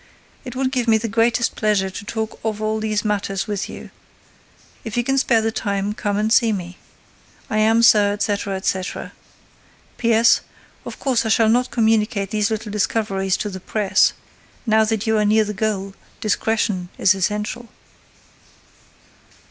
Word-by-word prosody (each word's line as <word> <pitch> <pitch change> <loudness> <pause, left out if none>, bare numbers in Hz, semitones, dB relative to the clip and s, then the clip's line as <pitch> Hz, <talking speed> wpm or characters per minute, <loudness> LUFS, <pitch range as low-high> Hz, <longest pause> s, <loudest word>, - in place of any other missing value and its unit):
It 250 -2 -8
would 260 0 0
give 250 -3 -1
me 220 -1 +5
the 225 +1 -3
greatest 230 +2 +1
pleasure 205 -3 +1
to 200 - -8
talk 220 0 -4
of 215 -1 -2
all 215 0 -1
these 215 -1 -1
matters 195 -2 -1
with 205 -2 -3
you. - - -10 0.9
If 225 +1 -5
you 240 - +2
can 270 +2 +1
spare 235 -4 +3
the 225 - 0
time, 200 -1 -2
come 205 -1 -2
and 215 +1 +1
see 230 -3 +4
me. 180 -3 -5 0.7
I 215 - +1
am, 225 +2 +3
Sir, 210 -3 +5
etc., 205 -1 -2
etc. 190 -1 -3 0.9
P.S.—Of 230 -1 0
course, 250 -4 0
I 220 - -2
shall 220 0 +4
not 245 +3 +2
communicate 215 -3 +1
these 210 -2 +1
little 220 -1 -4
discoveries 195 -2 0
to 210 - -3
the 190 - -7
press. 195 0 +2 0.5
Now 220 -1 +4
that 220 -1 -1
you 220 -1 +2
are - - +2
near 215 +1 +4
the 210 0 -4
goal, 200 -2 -2 0.3
discretion 215 -4 -1
is 190 - +4
essential. 210 +5 -3
215 Hz, 160 wpm, -21 LUFS, 205-225 Hz, 0.9 s, me